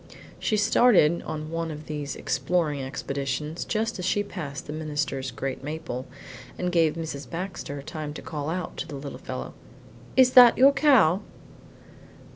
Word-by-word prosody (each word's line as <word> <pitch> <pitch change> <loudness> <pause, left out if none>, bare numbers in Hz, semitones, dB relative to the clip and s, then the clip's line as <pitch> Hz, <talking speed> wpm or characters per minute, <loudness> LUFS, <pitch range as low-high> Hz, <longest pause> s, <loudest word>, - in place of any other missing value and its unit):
She 215 - 0
started 205 -6 +4
on 155 0 -5
one 165 0 -2
of 150 0 -7
these 150 -2 -4
exploring 155 -6 0
expeditions 140 +3 -3
just 225 -1 -2
as 180 - -3
she 205 +2 +1
passed 140 -8 -6
the 150 - -6
minister's 150 -3 -2
great 135 +2 -5
maple, 140 -4 -5 0.5
and 180 0 -1
gave 165 -3 +3
Mrs. 150 -5 -6
Baxter 170 -5 -5
time 155 0 -5
to - - -7
call 150 -1 -4
out 180 +1 -4
to - - -4
the 150 - -7
little 140 0 -7
fellow, - - -6 0.6
"Is 255 -1 +7
that 245 -2 +9
your 270 +2 +7
cow?" 260 - +4
155 Hz, 155 wpm, -26 LUFS, 145-185 Hz, 0.6 s, that